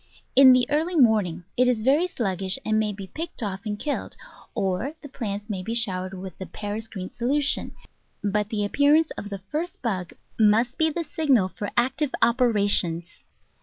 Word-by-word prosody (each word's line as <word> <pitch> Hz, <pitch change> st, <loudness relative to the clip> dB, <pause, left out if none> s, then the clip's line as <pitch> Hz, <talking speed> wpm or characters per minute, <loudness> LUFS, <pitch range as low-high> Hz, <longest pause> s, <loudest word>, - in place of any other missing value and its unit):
In 265 Hz, 0 st, +9 dB
the 255 Hz, -1 st, +5 dB
early 320 Hz, +4 st, +1 dB
morning 210 Hz, -, +3 dB
it 250 Hz, +1 st, +3 dB
is 235 Hz, -3 st, +1 dB
very 290 Hz, +8 st, +3 dB
sluggish, 195 Hz, -, -1 dB
and 215 Hz, 0 st, +2 dB
may 215 Hz, -1 st, 0 dB
be 195 Hz, -1 st, -7 dB
picked 315 Hz, -, -6 dB
off 200 Hz, +1 st, -4 dB
and 210 Hz, 0 st, -2 dB
killed, 290 Hz, +6 st, -4 dB, 0.4 s
or 195 Hz, +11 st, -1 dB
the -, -, -7 dB
plants 210 Hz, -6 st, -5 dB
may 195 Hz, -4 st, -3 dB
be 225 Hz, +5 st, -4 dB
showered 190 Hz, -4 st, 0 dB
with 185 Hz, 0 st, -8 dB
the 190 Hz, -, -6 dB
Paris 210 Hz, +5 st, -5 dB
green 190 Hz, -4 st, -7 dB
solution, 280 Hz, +4 st, 0 dB, 0.5 s
but 210 Hz, 0 st, 0 dB
the 210 Hz, -3 st, -1 dB
appearance 290 Hz, +8 st, +3 dB
of 205 Hz, -, -6 dB
the 200 Hz, -2 st, -7 dB
first 330 Hz, +4 st, -3 dB
bug 185 Hz, -7 st, -2 dB, 0.3 s
must 225 Hz, +4 st, +3 dB
be 320 Hz, 0 st, +4 dB
the 335 Hz, +2 st, -3 dB
signal 270 Hz, -, +2 dB
for 190 Hz, +3 st, -5 dB
active 265 Hz, +4 st, +1 dB
operations. 205 Hz, -8 st, +2 dB
220 Hz, 175 wpm, -25 LUFS, 195-270 Hz, 0.5 s, In